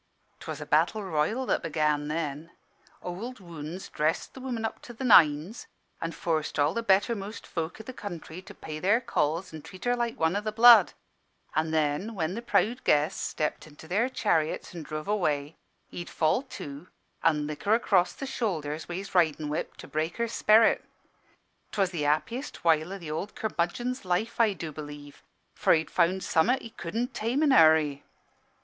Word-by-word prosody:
"'Twas - - -6
a - - -6
battle 215 -1 +2
royal 190 +9 0
that - - +1
began 150 -2 0
then. 155 0 -3 0.6
Ould 220 +8 -6
Wounds 170 0 -8
dressed 155 +2 -1
the - - -10
woman 245 -4 -3
up 225 - -5
to 240 - -10
the 235 - -7
nines, 170 - +4 0.3
an' 165 - -2
forced 160 -2 -2
all 145 +3 +3
the 230 - -1
bettermost 205 0 0
folk 165 -1 -4
i' - - -8
the 260 - -8
county 175 -6 -7
to 195 +2 -13
pay 155 -1 -7
their 205 +7 +3
calls 170 -6 -1
an' 155 - -7
treat 185 +6 -11
her 245 0 +2
like 235 -1 -2
one 160 +3 +2
o' 205 - 0
the 215 0 -3
blood; 225 -2 +8 0.6
and 155 +1 0
then, 160 +8 0
when 165 -1 -1
the 230 - -4
proud 235 +1 +1
guests 150 +1 +2
stepped 155 0 -3
into 155 +1 -14
their 215 +9 +1
chariots 165 -12 0
an' 170 - -6
druv 155 0 -5
away, 155 -7 0 0.4
he'd 175 - -6
fall 160 +9 +1
to, 150 - -9 0.3
an' 150 -2 +2
lick 150 0 -6
her 210 +2 +5
across 195 -6 +2
the 275 - -6
shoulders 165 - -3
wi' 175 - -4
his 195 +2 -6
ridin' 155 -4 +2
whip, 155 +3 -4
to - - -10
break 155 +2 -2
her 235 - +1
sperrit. 220 0 +4 0.9
'Twas 195 -3 +1
the 170 -4 -3
happiest 230 - -2
while 160 +1 +3
o' 195 - -4
th' 165 -5 -7
ould 190 +7 -4
curmudgeon's 220 +6 -2
life, 185 +6 -1
I 225 -3 +4
do 165 -3 -6
b'lieve; 145 -1 -10 0.3
for - - +3
he'd 160 0 -2
found 185 +2 +2
summat 245 +11 +2
he 230 - -9
cudn' 225 +7 -3
tame 240 +7 -1
in 295 - +4
a - - +6
hurry. 155 -3 +5
175 Hz, 185 wpm, -28 LUFS, 155-220 Hz, 0.9 s, blood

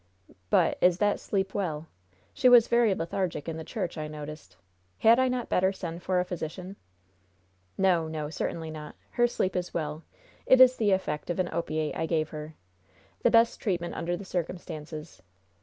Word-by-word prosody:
"But, - - +3
is 180 -1 +5
that 205 +1 +1
sleep 195 -1 -2
well? 165 -6 -2 0.5
She 255 -3 +4
was 240 -2 +7
very 235 -4 +3
lethargic 170 -2 -3
in 165 -1 -3
the 160 - -6
church, 180 -4 -4
I 155 - -3
noticed. 150 - -9 0.4
Had 230 - +5
I 260 - +4
not 250 -2 -2
better 190 +1 +2
send 170 -3 -6
for 185 0 +1
a 180 - 0
physician?" 180 +2 -6 1.0
"No, 180 -4 +3
no, 155 -1 -4
certainly 160 0 -3
not. 150 -1 -8 0.2
Her 240 0 +3
sleep 190 -5 -1
is 180 -1 -3
well. 155 -1 -3 0.4
It 260 - +6
is 255 0 +8
the 215 -2 +2
effect 180 -6 -1
of 175 - -1
an 180 -1 0
opiate 155 -2 -2
I 160 - -1
gave 155 -2 0
her. 155 0 -8 0.7
The - - +4
best 230 0 +4
treatment 175 -4 -2
under 175 +1 -2
the 200 - -9
circumstances. 165 -3 -6
175 Hz, 175 wpm, -28 LUFS, 155-195 Hz, 1.0 s, is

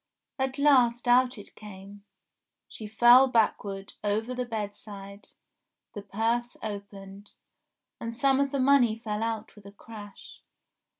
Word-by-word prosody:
At 265 +1 -2
last 250 -4 +3
out 250 0 +3
it 205 - -12
came, 200 -1 -12 0.6
she 215 - -9
fell 240 +4 +6
backward 205 -4 -1
over 215 +4 -1
the 250 -1 -4
bed 210 -3 -4
side, 200 -1 -11 0.7
the 205 - -6
purse 225 +4 -2
opened, 200 -1 -9 0.7
and 230 0 -6
some 270 0 +2
of 280 0 +1
the 275 - -3
money 255 -4 +3
fell 215 -2 -4
out 225 -1 -4
with 205 -2 -15
a - - -11
crash. 205 0 -13
220 Hz, 135 wpm, -27 LUFS, 205-245 Hz, 0.7 s, fell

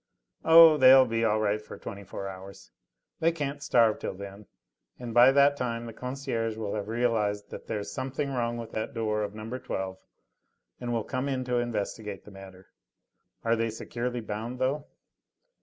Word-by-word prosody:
"Oh! 165 -1 +9
they'll 130 -1 +8
be 115 -1 -1
all 110 -1 +2
right 105 0 0
for - - -10
twenty 100 0 -8
four 100 +1 -6
hours. 95 +1 -10 0.5
They 165 +1 +3
can't 145 -3 -4
starve 115 -5 +3
till - - -4
then, 100 +1 -10 0.5
and 120 -2 -7
by 120 +3 +7
that 140 +1 +5
time 120 -3 -3
the 115 - -8
concierge 125 -3 -3
will 105 -2 -3
have 105 -1 -3
realised 110 -3 0
that - - -9
there's 105 -2 -4
something 135 +4 -3
wrong 120 -2 -1
with 115 -1 -7
the 110 - -2
door 110 -1 -2
of 105 0 -4
No. 115 +4 -6
12 95 -4 -4 0.8
and 120 -1 -4
will 115 -2 0
come 130 +3 -3
in 130 -2 -1
to 125 -1 -1
investigate 110 -2 -4
the 105 - -12
matter. 95 -1 -13 0.7
Are 115 0 +2
they 115 0 0
securely 120 +2 -4
bound, 110 +3 -5
though?" 135 +3 -1
115 Hz, 175 wpm, -28 LUFS, 105-130 Hz, 0.8 s, Oh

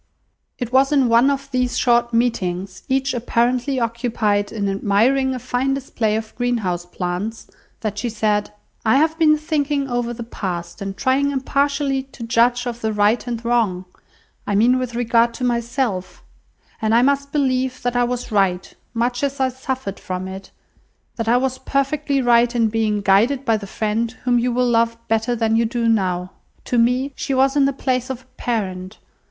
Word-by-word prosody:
It 245 -1 -5
was 270 +2 +4
in 275 -4 +3
one 235 +4 +5
of 275 0 -3
these 250 -1 0
short 240 -1 +3
meetings, 195 -6 -1
each 270 +1 +1
apparently 245 +2 0
occupied 225 -3 0
in 205 -3 -2
admiring 230 +7 +2
a - - -3
fine 255 +2 -1
display 235 -5 -1
of 220 0 -4
greenhouse 210 -8 -1
plants, 180 +5 -4 0.4
that 210 -2 -3
she 240 - -2
said— 210 -2 0 0.3
"I 220 +2 +3
have 315 +3 +3
been 305 -1 +5
thinking 295 -2 -1
over 245 -2 -1
the 240 0 -6
past, 180 -5 -5
and 195 0 -5
trying 275 +1 +2
impartially 280 0 0
to 235 - -8
judge 240 +1 +2
of 240 -1 -5
the 220 - 0
right 210 +4 +2
and 235 -1 -4
wrong, 220 -7 +1 0.6
I 205 - 0
mean 245 +5 +4
with 250 -2 -4
regard 235 0 +2
to 255 - -6
myself; 235 -5 -2 0.6
and 220 +1 +2
I 240 - +5
must 280 +1 +1
believe 260 -3 0
that 245 0 -1
I 245 - +3
was 245 0 -3
right, 190 -3 +1 0.2
much 245 +1 0
as 280 -1 -2
I 260 -1 +2
suffered 260 -5 -5
from 185 0 -5
it, 190 +1 -8 0.7
that 230 -1 -3
I 240 +2 +4
was 260 0 -1
perfectly 275 0 0
right 240 0 +4
in 230 -2 +3
being 215 -1 0
guided 225 +8 +3
by 225 -3 +3
the 205 -2 -5
friend 220 +2 -1
whom 245 -1 +3
you 245 +1 0
will 250 +1 +1
love 230 -1 +2
better 225 +2 +1
than 225 -1 +1
you 230 +1 +3
do 230 +1 -1
now. 185 -5 0 0.3
To 245 - +1
me, 250 +4 +2
she 275 - -2
was 270 +1 +3
in 280 -2 +4
the 275 - +2
place 255 -1 -1
of 260 -1 -5
a 255 0 -20
parent. 190 -4 -3
240 Hz, 180 wpm, -20 LUFS, 220-260 Hz, 0.7 s, one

